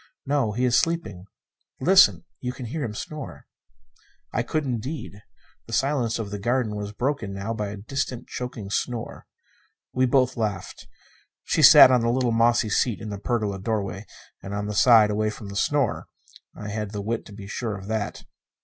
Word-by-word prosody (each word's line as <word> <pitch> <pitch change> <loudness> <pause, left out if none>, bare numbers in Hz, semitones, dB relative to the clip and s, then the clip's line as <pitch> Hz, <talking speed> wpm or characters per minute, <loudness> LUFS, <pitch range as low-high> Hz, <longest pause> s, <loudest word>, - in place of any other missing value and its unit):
"No. 135 -6 0
He 125 +4 0
is 125 -1 +3
sleeping. 165 - -2 0.5
Listen 105 - +5
you 125 0 -4
can 125 0 -8
hear 145 +6 -4
him 110 -4 -4
snore." 135 - -7 0.9
I - - +1
could, 155 - -1
indeed. 125 -3 -5 0.5
The 115 - -8
silence 135 -3 +1
of 110 -3 -5
the 105 - -4
garden 120 0 0
was 105 0 -5
broken 120 -3 -2
now 100 +3 -3
by 105 -2 -3
a 100 +1 -6
distant, 125 +3 -4
choking 115 -5 -6
snore. 120 +1 -3 0.7
We 130 0 +2
both 130 0 +2
laughed. 105 -4 -4 0.6
She - - 0
sat 130 - +10
on 125 -2 +4
the 115 - +1
little 125 0 +1
mossy 115 0 +3
seat 110 +2 +1
in 110 -2 -6
the 100 - -5
pergola 105 -3 -1
doorway 100 -1 -3 0.3
And 100 +1 -6
on 105 0 -2
the 105 - -3
side 110 -1 +6
away 110 +1 0
from 105 -1 -8
the 100 - -8
snore. 140 +4 0 0.5
(I 105 - -7
had 105 0 -4
the 105 - -3
wit 115 +2 -2
to - - -13
be 100 -1 -10
sure 105 +1 -4
of 95 - -10
that.) 110 0 -3
110 Hz, 185 wpm, -25 LUFS, 105-125 Hz, 0.9 s, sat